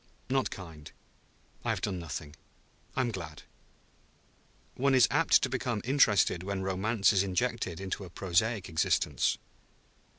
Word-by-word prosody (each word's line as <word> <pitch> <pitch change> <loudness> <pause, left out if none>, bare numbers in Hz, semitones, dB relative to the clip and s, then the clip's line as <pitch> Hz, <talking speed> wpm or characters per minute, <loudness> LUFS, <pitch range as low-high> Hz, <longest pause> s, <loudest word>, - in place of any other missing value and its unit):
"Not 135 0 +1
kind; 80 -5 -10 0.7
I - - -2
have - - -1
done 95 -4 -2
nothing. 75 -2 -6 0.6
I - - +2
am 120 -2 0
glad.... 80 -7 -7 1.3
One 135 +1 +2
is 125 -3 +6
apt - - +4
to - - +3
become 120 -4 -2
interested 120 -9 +3
when 95 0 -3
Romance 100 +3 +2
is 95 - +3
injected 100 -2 -1
into 95 +1 -4
a 90 - -9
prosaic 95 +4 0
existence." 80 -2 +1
95 Hz, 135 wpm, -30 LUFS, 85-115 Hz, 1.3 s, is